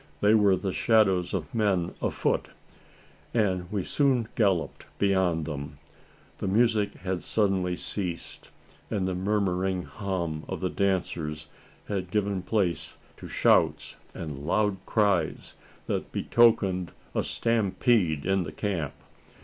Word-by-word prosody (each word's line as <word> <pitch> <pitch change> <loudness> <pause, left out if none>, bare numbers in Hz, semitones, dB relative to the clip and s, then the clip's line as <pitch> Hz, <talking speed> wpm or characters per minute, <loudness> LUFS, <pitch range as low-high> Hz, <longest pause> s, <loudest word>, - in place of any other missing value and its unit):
They 105 +1 +4
were 100 -3 +5
the 95 +1 -3
shadows 95 -6 +3
of - - -4
men 100 -6 +1
afoot; - - 0 0.9
and 95 -5 +1
we 100 -3 -1
soon 130 -3 +1
galloped 95 -7 0
beyond 95 -5 +2
them. 75 -1 -6 0.6
The - - -2
music 110 0 +2
had 95 -1 -3
suddenly 95 -4 +1
ceased; 90 -2 -4 0.4
and 95 -3 -1
the 95 - -1
murmuring 95 -1 0
hum 85 -7 -3
of - - -4
the 90 -1 -1
dancers 80 -6 -1 0.4
had 95 -3 -3
given 100 -1 0
place 95 -4 -1 0.2
to - - -9
shouts - - +2 0.2
and 75 -4 -5
loud 105 +1 +2
cries, 100 -7 +1 0.3
that - - -3
betokened 100 -6 +3 0.2
a - - +1
stampede 100 -7 +1
in 95 0 +2
the 80 -3 -4
camp. 80 -4 -3
95 Hz, 125 wpm, -27 LUFS, 90-105 Hz, 0.9 s, were